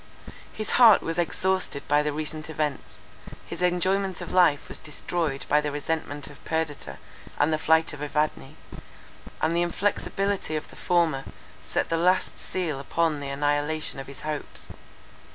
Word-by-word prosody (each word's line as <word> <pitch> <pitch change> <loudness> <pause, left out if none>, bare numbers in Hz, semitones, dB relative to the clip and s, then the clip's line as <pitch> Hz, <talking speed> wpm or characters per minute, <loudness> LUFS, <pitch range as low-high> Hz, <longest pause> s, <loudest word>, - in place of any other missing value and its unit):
His 215 - -4
heart 225 -4 +9
was 165 +1 -2
exhausted 185 -3 0
by 145 0 +4
the 150 0 0
recent 155 +1 -4
events; 150 -3 -3 0.5
his - - -7
enjoyment 185 +1 +1
of - - -6
life 175 -6 +4
was - - -7
destroyed 155 -1 -2
by 150 +1 +4
the 150 -1 -2
resentment 145 -1 -3
of 145 - -13
Perdita, 150 - -2 0.4
and 155 +2 +3
the 155 - +1
flight 160 0 +3
of 145 - -8
Evadne; 150 - -1 0.9
and 160 +1 +2
the 170 - +3
inflexibility 195 0 0
of 155 - -4
the - - -13
former, 165 -6 +1 0.4
set - - -1
the 165 - +1
last 180 +3 +2
seal 165 -7 -3
upon 160 +2 0
the 140 -1 -5
annihilation 145 +1 0
of 135 - -7
his 140 - -10
hopes. 150 -1 -5
155 Hz, 155 wpm, -26 LUFS, 145-175 Hz, 0.9 s, heart